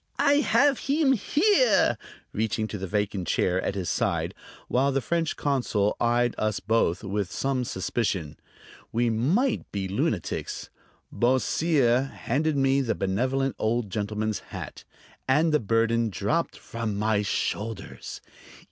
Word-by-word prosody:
"I 285 0 +4
have 285 -2 +3
heem 280 -1 +2
here," 405 - +3 0.4
reaching 110 0 -1
to 105 - -5
the 95 - -4
vacant 100 -2 -1
chair 90 +3 +1
at 95 - -2
his 95 -3 -3
side, - - 0 0.3
while 135 +3 +2
the 135 - +1
French 165 +3 -1
consul 120 -7 0
eyed 120 0 +2
us 110 -1 0
both 100 -4 +1
with 100 -1 -2
some 135 -2 -1
suspicion. 95 -7 -2 0.5
We 120 0 +1
might 180 - +1
be 100 -2 -2
lunatics. 95 - -2 0.4
Beausire 130 0 +2
handed 145 +5 -1
me 135 0 +3
the 115 -4 -1
benevolent 130 +8 0
old 110 -2 0
gentleman's 105 +1 -2
hat, - - -9 0.4
and 150 +4 +3
the 150 - +4
burden 115 +1 +1
dropped 165 - -1
from 115 -3 -4
my 105 0 +1
shoulders. 105 +1 -3
115 Hz, 130 wpm, -26 LUFS, 105-140 Hz, 0.5 s, I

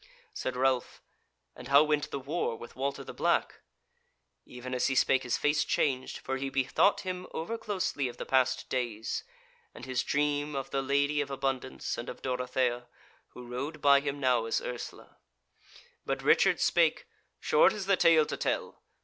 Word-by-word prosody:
Said 130 - -3
Ralph: 130 0 0 0.5
"And - - -10
how 140 +2 +7
went 150 -1 0
the - - -4
war 140 -1 -2
with 120 - -11
Walter 140 +2 -3
the - - -9
Black?" - - 0 0.9
Even 125 +1 -8
as 125 - +1
he 135 - 0
spake 130 +1 +3
his 125 -2 -1
face 150 0 +2
changed, 130 -2 0
for 135 0 -4
he 135 +1 -3
bethought 135 +9 +2
him 185 -1 -5
over 170 +8 -3
closely 190 - -2
of 120 - -8
the - - -5
past 130 0 +1
days, 120 -4 -3 0.5
and - - -9
his 130 -2 -1
dream 145 0 0
of 135 -1 -4
the 135 - 0
Lady 140 +2 +1
of 145 - -4
Abundance 135 -1 -3
and 120 - -6
of - - -9
Dorothea, 125 -1 -1 0.5
who 125 - -10
rode 140 +6 -5
by 140 -1 +6
him 140 0 -3
now 125 -4 +2
as 115 - 0
Ursula. 120 -1 -8 0.9
But - - -3
Richard - - +4
spake: - - +2 0.3
"Short 150 - +4
is 205 -2 -5
the 195 0 +4
tale 165 -3 +5
to - - -4
tell. - - -2
135 Hz, 175 wpm, -30 LUFS, 125-145 Hz, 0.9 s, how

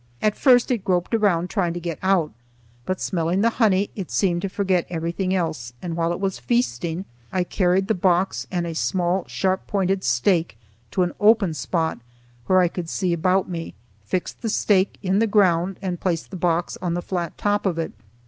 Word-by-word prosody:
At 210 -1 +1
first 250 -2 +4
it 240 - +1
groped 180 +2 0
around 185 -6 +2
trying 175 -5 0
to - - -3
get 170 -2 -5
out, 185 -5 +2 0.6
but, 185 0 -1
smelling 175 +2 0
the 230 +2 +3
honey, 200 -2 +3
it 195 -5 -5
seemed 175 -3 +1
to 195 - -2
forget 185 -3 0
everything 175 +2 -2
else, 155 -9 -2
and 170 +2 -4
while 165 0 0
it 175 - -3
was 190 -5 -2
feasting 120 +9 -1 0.3
I 185 -1 +1
carried 185 +1 +1
the 220 - +2
box 185 0 +1
and 175 -2 -1
a 165 - -4
small 180 +2 0
sharp 190 0 -1
pointed 195 -1 0
stake 160 - +1 0.3
to 180 - +1
an 175 - -2
open 210 -5 +4
spot, 160 +2 -1 0.5
where 185 0 +5
I 180 - +4
could 170 -1 -5
see 180 -1 0
about 185 +3 +2
me, 165 - -6 0.3
fixed 180 - -3
the 225 - -2
stake 200 -2 +2
in 190 +1 +2
the 225 - +3
ground, 190 -3 +2
and 180 -2 -3
placed 170 -3 -2
the - - -6
box 175 -1 0
on 175 -2 -1
the 175 - -3
flat 175 -3 -3
top 205 -1 +1
of 175 -3 -1
it. 165 - -2
180 Hz, 195 wpm, -23 LUFS, 170-195 Hz, 0.6 s, where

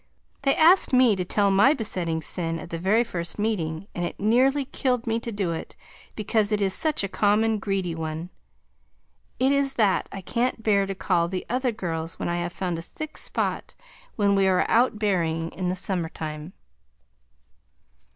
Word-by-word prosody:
They 275 -1 +2
asked 335 -1 +5
me 250 -4 +5
to 185 - -2
tell 200 +2 +1
my 205 +10 +5
besetting 170 - -2
sin 165 +1 -2
at 165 - -9
the 165 - -3
very 205 +7 +3
first 175 -6 -5
meeting, 190 -6 -2
and 175 - -3
it 175 - -4
nearly 260 +7 +3
killed 250 -2 -1
me 225 0 0
to 230 0 -5
do 200 -5 -2
it 165 - -6 0.4
because 215 0 0
it 210 - +1
is 195 -2 +1
such 310 -3 +1
a - - 0
common 215 +2 +2
greedy 195 -4 -2
one. 160 +1 -5 1.1
It 260 +2 +2
is 280 -1 +2
that 205 -5 +1
I 195 - -6
can't 235 +3 -1
bear 200 -2 +2
to 195 - -4
call 175 -3 +1
the 185 +1 -4
other 250 0 +1
girls 165 -7 -4
when - - -3
I 175 - -1
have 175 0 -3
found 175 -2 -3
a - - -5
thick 310 - -8
spot - - -3 0.4
when 200 -2 +2
we 195 -1 +3
are 185 -1 +3
out 235 -1 +3
berrying 165 -6 0
in 180 +1 -2
the 180 - -1
summer 180 -3 -1
time. 155 +2 -7
195 Hz, 185 wpm, -25 LUFS, 175-230 Hz, 1.1 s, asked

